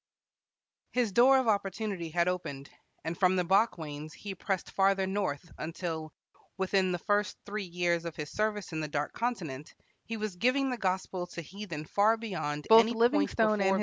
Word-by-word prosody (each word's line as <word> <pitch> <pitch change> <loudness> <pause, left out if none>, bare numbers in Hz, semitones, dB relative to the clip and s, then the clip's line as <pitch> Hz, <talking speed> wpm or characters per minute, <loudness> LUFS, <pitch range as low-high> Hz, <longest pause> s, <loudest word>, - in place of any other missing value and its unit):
His 245 -4 +1
door 255 +6 +6
of 260 -2 +1
opportunity 200 -3 -1
had 170 +2 +1
opened, 145 -7 -3 0.3
and 165 +1 -3
from 185 +1 +3
the 180 - +2
Bakwains 160 -6 0
he 200 -2 -7
pressed 190 0 -3
farther 195 0 +3
north, 185 -5 -2
until, 160 -1 -4 0.5
within 190 -1 +1
the 175 - 0
first 205 +3 0
three 210 0 -4
years 175 -1 0
of 170 - -5
his 150 -1 -6
service 210 -3 -1
in 160 - -3
the 155 - -2
Dark 145 0 -2
Continent, 170 - -4 0.3
he 225 - -4
was 215 -3 -3
giving 260 +5 +2
the 250 - -2
gospel 185 -3 -2
to 170 -1 -7
heathen 170 -3 -7
far 210 +6 +3
beyond 150 -10 -4
any 225 +1 +8
point 235 +2 +4
before 300 - +3
visited - - -10
by 225 - +5
white 215 -1 +2
men. 190 - +2
190 Hz, 185 wpm, -30 LUFS, 170-215 Hz, 0.5 s, any